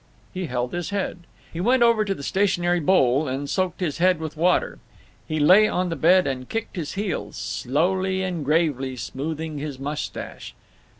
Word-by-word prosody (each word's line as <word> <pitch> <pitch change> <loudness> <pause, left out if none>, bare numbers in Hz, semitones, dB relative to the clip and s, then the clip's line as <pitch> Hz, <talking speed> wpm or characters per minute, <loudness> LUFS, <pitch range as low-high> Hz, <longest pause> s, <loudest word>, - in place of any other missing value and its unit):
He 185 -2 -3
held 125 -1 -2
his 175 0 -3
head. 200 -2 -2 0.3
He 165 - -3
went 245 +5 +4
over 230 -2 +4
to 195 -2 -2
the 140 - -9
stationary 175 -1 +1
bowl 145 -4 +3
and 135 +2 -3
soaked 185 +2 -1
his 170 -3 -2
hair 185 +1 +4
with 160 -1 -6
water. 175 +3 +1 0.5
He 155 0 -2
lay 190 +8 +6
on 180 -3 -1
the 165 - -2
bed 180 +3 +4
and 130 -1 -4
kicked 225 -1 -4
his 160 -5 -4
heels, 200 -3 -3
slowly 185 +7 0
and 180 -4 -3
gravely 140 -4 +1
smoothing 155 +4 -5
his 145 -2 -5
mustache. 145 +3 -6
170 Hz, 175 wpm, -24 LUFS, 145-185 Hz, 0.5 s, lay